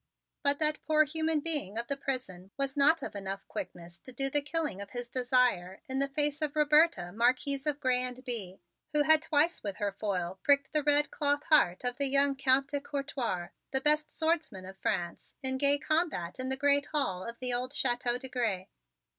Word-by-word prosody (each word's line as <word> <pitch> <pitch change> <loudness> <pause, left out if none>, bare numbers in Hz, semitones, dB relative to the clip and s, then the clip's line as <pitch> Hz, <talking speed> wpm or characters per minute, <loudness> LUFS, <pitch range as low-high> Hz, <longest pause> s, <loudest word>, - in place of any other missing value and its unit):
But 285 0 +4
that 305 0 +1
poor 310 0 +5
human 315 0 -1
being 285 - -1
of 235 - -1
the 280 - -2
prison 250 -10 -5
was 275 -1 -1
not 295 +3 +4
of - - -6
enough 195 0 -6
quickness 170 0 -8
to 255 - -10
do 270 +2 -2
the 290 - +2
killing 300 - -2
of 200 - -8
his 245 +3 -6
desire 245 -7 +1
in 265 0 -2
the 275 - +1
face 295 +2 0
of 305 0 -2
Roberta, 300 - +3
Marquise 255 +6 +1
of 295 -1 0
Grez 255 -1 +2
and 255 - -15
Bye, 205 -7 -4 0.4
who 300 -1 +3
had 310 0 +5
twice 315 +2 +1
with 200 -2 -5
her 205 -2 -2
foil 190 -3 -3
pricked 280 -1 +2
the 305 - +2
red 295 0 +3
cloth 290 0 0
heart 190 - +4
of 245 0 -2
the 280 - +2
young 275 +1 +3
Count 270 0 +2
de 285 -1 -3
Couertoir, 265 -11 -4 0.2
the 265 - 0
best 300 +1 +2
swordsman 315 - -2
of 190 +1 -12
France, 170 -1 -3
in 260 0 -1
gay 285 0 +4
combat 285 - -1
in 255 0 -3
the 265 - -1
great 285 +1 +3
hall 195 -12 -1
of 235 0 -7
the 250 0 -1
old 250 +1 -2
Chateau 245 -3 0
de 265 +1 -9
Grez. 225 -8 -1
270 Hz, 205 wpm, -30 LUFS, 225-290 Hz, 0.4 s, poor